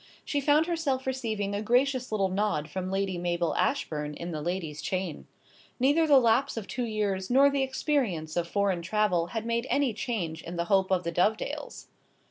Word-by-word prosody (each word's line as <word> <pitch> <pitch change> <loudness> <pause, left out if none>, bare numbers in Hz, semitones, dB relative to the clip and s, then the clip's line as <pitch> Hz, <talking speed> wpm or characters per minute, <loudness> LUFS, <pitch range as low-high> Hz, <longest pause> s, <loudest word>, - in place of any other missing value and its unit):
She 285 - -1
found 295 +3 +4
herself 320 -7 -1
receiving 220 -6 -2
a 200 - -1
gracious 250 +3 +1
little 195 -3 +1
nod 190 -6 0
from 185 +1 -3
Lady 195 -2 -1
Mabel 175 -1 0
Ashbourne 150 - -1
in 170 +3 -6
the 155 -2 -4
ladies' 165 -2 -3
chain. 185 -4 -3 0.5
Neither 290 +6 +3
the 285 -2 +7
lapse 235 0 +3
of 220 - -3
two 245 +4 -3
years 205 -4 -2
nor 275 +3 +5
the 280 -1 0
experience 260 - -1
of 175 -1 0
foreign 195 -1 0
travel 180 -2 +1
had 225 +4 -4
made 235 +2 -1
any 280 -5 +2
change 175 -9 -3
in 170 - -7
the 170 0 -1
hope 190 +1 +2
of 185 -1 +1
the 170 - -2
Dovedales. 205 +6 -1
205 Hz, 185 wpm, -28 LUFS, 175-255 Hz, 0.5 s, the